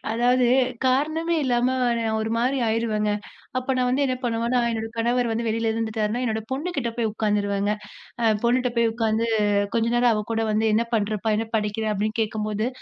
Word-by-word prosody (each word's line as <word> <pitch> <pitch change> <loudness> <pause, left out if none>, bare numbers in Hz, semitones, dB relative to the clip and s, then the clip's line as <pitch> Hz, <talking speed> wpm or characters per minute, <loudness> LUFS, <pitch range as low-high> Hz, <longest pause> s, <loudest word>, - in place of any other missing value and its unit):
அதாவது 245 +2 +3 0.4
காரணமே 310 +6 +1
இல்லாம 250 0 +1 0.2
நான் 220 -1 -1
ஒரு 220 0 -2
மாதிரி 255 +4 +1
ஆயிருவேங்க. 220 -2 0 0.5
அப்ப 255 +1 -2
நான் 250 -1 +1
வந்து 260 +3 +1
என்ன 255 - 0
பண்ணுவேன்னா, 235 +1 +1
என்னோட 225 -1 -3
கணவர் 240 +1 +1
வந்து 230 +1 -1
வெளில 225 0 0
இருந்துட்டாருன்னா, 220 +1 -1
என்னோட 220 -2 -1
பொண்ணுகிட்ட 275 -3 -2
போய் 230 -2 0
உட்காந்துருவேங்க. 205 -1 0 0.5
அ - - 0 0.2
பொண்ணுகிட்ட 250 +1 +2
போய் 230 -1 +4
உட்காந்து 225 0 0 0.5
கொஞ்ச 230 0 +2
நேரம் 240 -1 +4
அவ 210 - 0
கூட 225 0 0
வந்து 215 +1 +1
என்ன 230 +2 +3
பண்றப்பா? 215 0 0
என்ன 225 0 -2
படிக்குறே? 215 0 -1
அப்டீன்னு 215 +2 -2
கேட்கும்போது, 215 0 -1
230 Hz, 170 wpm, -24 LUFS, 220-245 Hz, 0.5 s, போய்